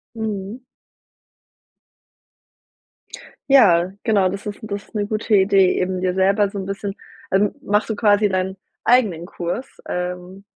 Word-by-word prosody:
Mhm. 215 0 -4 2.9
Ja, 185 -9 +5
genau, 205 -5 +3
das 195 +2 -5
ist 205 -1 -6
das 200 -2 -5
ist - - -27
'ne 205 -1 -1
gute 215 +1 -2
Idee, 195 -1 +4
eben 185 0 -1
dir 185 -1 0
selber 195 +2 +2
so 200 - -8
'n 190 - -5
bisschen 195 0 -4 0.4
ähm, 200 +4 +2
machst 210 -3 0
du 220 - -1
quasi 205 -1 +3
deinen 190 0 -2 0.3
eigenen 215 -9 +2
Kurs, 175 +8 -6
ähm, 180 +2 -5
195 Hz, 135 wpm, -21 LUFS, 185-210 Hz, 2.9 s, Ja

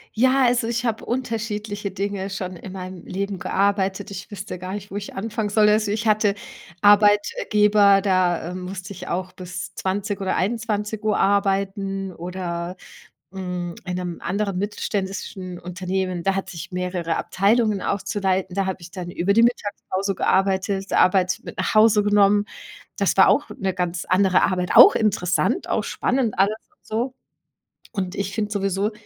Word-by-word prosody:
Ja, 260 +4 +4
also, 240 -1 +2
ich 235 +1 -1
habe 225 -2 -1
unterschiedliche 220 -4 -3
Dinge 195 0 -3
schon 185 -1 -5
in 185 +2 -9
meinem 185 -2 -7
Leben 195 0 -3
gearbeitet. 195 0 0
Ich 190 -1 -7
wüsste 195 -2 -7
gar 185 +1 -6
nicht, 205 0 -7
wo - - -7
ich 205 0 -6
anfangen 215 +1 -2
soll. 210 +1 +4
Also, 210 0 +2
ich 215 +2 -2
hatte 210 -2 +3 0.5
Arbeitgeber, 205 0 +5
da, 185 -3 +1
äh, - - -6
musste 185 +1 -6
ich 180 - -9
auch 185 +1 -3
bis 185 0 -7
20 200 +1 -2
oder 190 - 0
21:00 215 0 -1
arbeiten 195 -1 0
oder, 175 0 -5 0.5
mm, 180 -2 -4
in 180 -1 -3
'nem 180 -2 -4
anderen 200 -1 -2
mittelständischen 195 -2 -4
Unternehmen, 185 0 -3
da 195 +1 +1
hat 195 - -4
ich 170 - -8
mehrere 180 -2 -2
Abteilungen 210 +1 +1
auch 200 - -1
zu 210 - -3
leiten. 190 -2 0
Da 195 -1 0
habe 190 -1 -4
ich 170 +1 -11
dann 180 -1 -6
über 180 +3 0
die 230 - +5
Mittagspause 205 -4 -1
gearbeitet, 195 0 +1
Arbeit 185 0 +3
mit - - -9
nach - - -1
Hause 215 -1 +6
genommen. 205 0 +4 0.5
Das - - +1
war - - +7
auch - - +2
'ne 195 -5 -1
ganz 180 -1 -2
andere 185 0 +3
Arbeit, 180 -1 0
auch - - +10
interessant, 190 -5 +1
auch - - 0
spannend 245 -4 -1
alles 200 +3 +2
und - - -37
so. 240 +4 -2 0.8
Und 185 -2 -3
ich 200 0 -3
finde 210 -2 -2
sowieso, 195 0 0
195 Hz, 165 wpm, -23 LUFS, 185-210 Hz, 0.8 s, auch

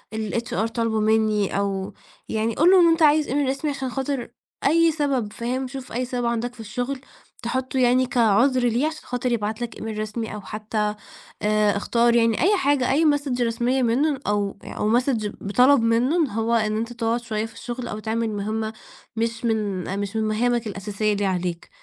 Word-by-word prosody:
الHR 220 -1 -2
طالبه 230 -1 -1
مني" 215 -2 +2
أو 195 -1 -2 0.4
يعني 220 +1 -1
قُل 335 +4 +5
له 380 - +7
إن 340 - +6
أنت 330 0 +3
عايز 300 0 +5
إيميل 280 0 0
رسمي، 275 +2 -1
عشان 270 -2 -4
خاطر 265 0 -3 0.3
أي 330 +3 +4
سبب، 275 -8 -1
فاهم؟ 255 +3 -3
شوف 260 -1 -8
أي 250 +2 -1
سبب 245 -1 -3
عندك 235 +1 -1
في 250 - -19
الشغل، 245 +5 -4 0.4
تحُطُّه 260 +2 -2
يعني 250 +1 +4
كعذر 245 +2 +3
ليه، 245 +6 +1
عشان 315 -1 -6
خاطر 245 0 -2
يبعت 220 0 -2
لك 235 - -4
إيميل 220 -1 -5
رسمي، 215 +1 -4
أو 210 - -6
حتّى 210 0 -3 0.5
آآ 210 -1 +2
اختار 235 +3 +2
يعني، 230 0 +3
أي 400 +5 +4
حاجه، 285 -7 +2
أي 315 +4 +3
مسج 285 -4 +1
رسمية 240 +3 +1
منه 270 +5 +1
أو 205 -1 0
أو 225 +3 +1
Message 240 -5 -1
بِطَلب 250 +6 +4
منه 235 +8 +2
هو، 225 +2 -1
إن 215 -2 +1
أنت 230 +2 -3
تقعد 235 0 -1
شوية 220 -2 -2
في 225 - -11
الشغل، 240 +2 -6
أو 215 - -5
تعمل 225 +1 -1
مهمة 215 +2 -3 0.4
مش 230 +2 -2
من 200 -4 -1
مش 200 +1 -4
من 220 - +1
مهامك 230 +2 0
الأساسية 210 +1 -2
اللي 205 0 -1
عليك، 180 -2 -2
230 Hz, 185 wpm, -23 LUFS, 215-255 Hz, 0.5 s, له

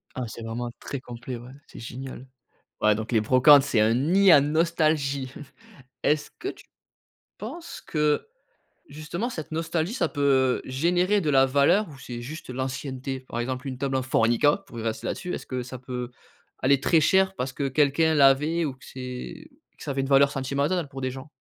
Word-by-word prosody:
Ah 125 - -3
c'est 115 - -9
vraiment 120 +1 -4
très 140 - -5
complet, 125 0 -7
ouais, 120 +2 -11 0.2
c'est - - -12
génial. 130 +2 -8 0.5
Ouais, 105 -1 +4
donc 110 +2 -5
les 110 -2 +3
brocantes, 135 +5 +6
c'est 125 -6 +1
un 110 +1 +4
nid 180 +9 +4
à 145 - +9
nostalgie. 150 -4 +1 0.7
Est-ce 150 0 +1
que 390 - -3
tu - - -11 0.7
penses 335 0 -8
que, 150 - 0 0.6
justement, 155 - -4
cette 160 -8 -7
nostalgie, 165 +4 -1
ça 170 -10 0
peut 135 -3 +2
générer 175 +9 +1
de 155 - -1
la 135 -1 +5
valeur 140 +10 +3
ou 140 - -12
c'est 120 -2 -7
juste 150 +3 -8
l'ancienneté? 130 +1 -4
Par 120 -2 -6
exemple, 130 +2 -3
une 130 -1 -5
table 135 0 -2
en 130 - +1
Formica, 125 +4 +3
pour 115 - -9
y - - -5
rester 110 -1 -3
là-dessus, 180 -1 -4
est-ce - - -5
que 130 -1 -3
ça 130 +1 -8
peut 125 -1 -5 0.5
aller 135 +1 +3
très 165 +1 +4
cher 190 +4 +3
parce 130 -6 -3
que 140 -2 -2
quelqu'un 150 +3 +2
l'avait 150 +4 +4
ou 135 - -3
que 130 - -17
c'est 125 -1 -8 0.3
que - - -11
ça - - -3
avait 135 0 -1
une 135 - -3
valeur 140 0 +5
sentimentale 140 +5 -1
pour 135 -1 -8
des 130 0 -1
gens? 135 +3 -9
135 Hz, 190 wpm, -25 LUFS, 130-155 Hz, 0.7 s, à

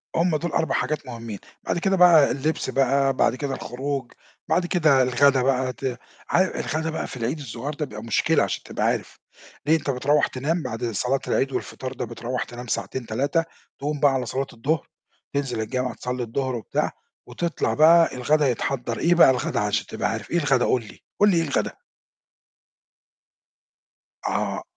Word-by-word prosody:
هُم 170 -1 +2
دُول 175 +2 -3
4 160 - 0
حاجات 155 -1 -1
مُهمّين، 115 -4 -7 0.2
بعد - - -1
كده 195 +2 +1
بقى 170 -5 +7
اللبس 150 0 -1
بقى، 135 +1 +2
بعد 120 - +2
كده 140 0 -3
الخروج، 135 0 -4 0.4
بعد 175 - +2
كده 155 -7 +4
الغدا 130 +2 +4
بقى 130 0 +1
ت 130 -1 -4 0.3
عا 175 - +4 0.2
الغدا 160 +1 -2
بقى 160 - -3
في - - -8
العيد 125 +6 -2
الصغيّر 135 +2 -5
ده 150 +1 -3
بيبقى 105 -4 -9
مشكلة 115 - +2
عشان - - -3
تبقى - - -2
عارف، - - -1 0.5
ليه؟ 155 +2 +4
أنت 155 - -2
بترَوّح 140 +3 +2
تنام 155 +6 -2
بعد 120 -1 -4
صلاة 125 +6 0
العيد 135 +1 +1
والفطار 130 0 -4
ده، - - -4
بترَوّح 120 +2 -4
تنام 120 +1 -9
ساعتين، 125 +2 -3
3، 140 +9 0 0.4
تقوم 145 +1 -2
بقى 140 -1 +4
على 130 -2 -1
صلاة 135 +3 -2
الضهر، 140 +6 -1 0.5
تنزل 135 -5 -1
الجامع 125 +3 -2
تصلّي 125 0 -4
الضهر 130 +2 -2
وبتاع، 115 - -1 0.4
وتطلع 170 -1 -1
بقى 165 +1 +6
الغدا 145 +4 +2
يتحضّر، 120 -1 -2
إيه 175 +1 +3
بقى 170 - +8
الغدا 125 -1 -1
عشان 105 -1 0
تبقى - - -2
عارف، - - -5
إيه 175 - +2
الغدا، 135 -6 +2
قُل 125 - +2
لي، - - -14 0.2
قُل 205 - +6
لي 175 - +2
إيه 165 - +3
الغدا؟ 145 -4 -1 2.6
آه، - - -1
135 Hz, 175 wpm, -24 LUFS, 125-155 Hz, 2.6 s, بقى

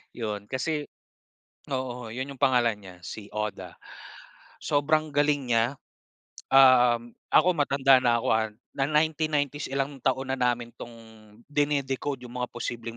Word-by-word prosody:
'yon. 105 -3 -4
Kasi 145 +3 -2 0.8
oo, 125 -3 -4
'yon 130 +5 -5
'yong 135 - -18
pangalan 120 -5 +3
niya, 95 -2 -12
si 105 -2 -8
Oda. 105 -1 -4 0.9
Sobrang 155 +2 +1
galing 145 -3 +1
niya. 115 0 +4 0.8
Um, 125 -3 +5 0.2
ako 180 - +5
matanda 135 -3 +4
na 120 -1 +3
ako, - - -3
ah, 110 0 0 0.2
na 135 - -2
1990s, 150 -2 0
ilang 135 +1 -2
taon 130 0 0
na 135 - -2
namin 120 -1 0
tong 120 - -8 0.6
dine-decode 145 -2 -1
'yong 125 +1 -6
mga 125 - -2
posibleng 115 -1 -5
130 Hz, 135 wpm, -27 LUFS, 120-145 Hz, 0.9 s, Um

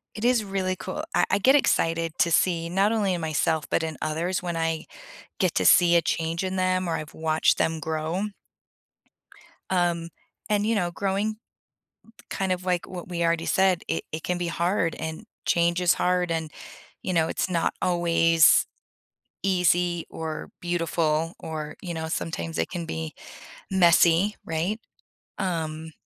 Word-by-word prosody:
it 215 - -3
is 245 -3 +3
really 190 -2 -1
cool 185 0 -5
I - - +4
I 200 - +3
get 260 +7 +5
excited 165 - +2
to 170 - +3
see, 165 -1 +2
not 195 +4 +2
only 205 -4 +1
in 175 - -3
myself, 160 0 0
but - - +1
in 160 -1 -4
others, 170 +4 -1
when 170 -2 -3
I 165 -1 -1 0.5
get 185 -3 +2
to - - +1
see 175 -1 +6
a - - +3
change 165 +1 -1
in 185 0 -3
them 185 -1 +1
or 165 - 0
I've 155 -2 -6
watched 160 0 +2
them 160 0 0
grow. 160 +3 -2 1.5
Um, 175 -2 0 0.4
and, 210 0 +2
you 225 +1 +1
know, 175 -4 0
growing 200 +4 -1 0.9
kind 190 -1 -2
of, 185 0 -2
like, 180 -2 0
what 180 -2 -8
we 170 -1 -1
already 165 0 +1
said, 190 -2 +2
it 165 - -2
it 155 +1 -5
can 180 0 -1
be 175 -1 -2
hard, 170 0 0
and 160 +6 -6 0.2
change 170 +1 +2
is 175 -1 +4
hard 180 -1 +1
and, 160 -2 -2 0.5
you 185 - -2
know, 165 -2 +3
it's 185 - -2
not 170 -2 0
always 165 -2 +4 0.8
easy 180 -2 +2
or 160 -1 -5
beautiful 165 -2 0
or 155 -2 -6
you 175 -2 -5
know, 160 0 -4
sometimes 165 0 -3
it - - 0
can 175 -2 -4
be 160 -1 -5 0.6
messy, 175 +1 +4
right? 170 +7 -2 0.6
Um, 160 -4 -3
170 Hz, 165 wpm, -25 LUFS, 165-185 Hz, 1.5 s, see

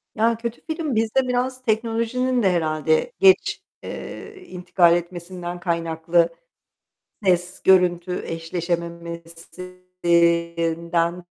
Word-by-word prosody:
Ya, 225 +1 +2
kötü 235 0 -5
film 315 -5 -2
bizde 225 +4 +1
biraz 250 +1 -1
teknolojinin 230 +2 0
de 190 - +4
herhâlde 155 - +1
geç, 385 -1 +4 0.2
eee, 425 -1 -8
intikal 180 -1 +3
etmesinden 175 0 -5
kaynaklı 165 0 +1 0.9
ses, 180 -1 +1
görüntü 180 -1 +3
eşleşememesinden 170 0 -2
175 Hz, 85 wpm, -22 LUFS, 170-225 Hz, 0.9 s, de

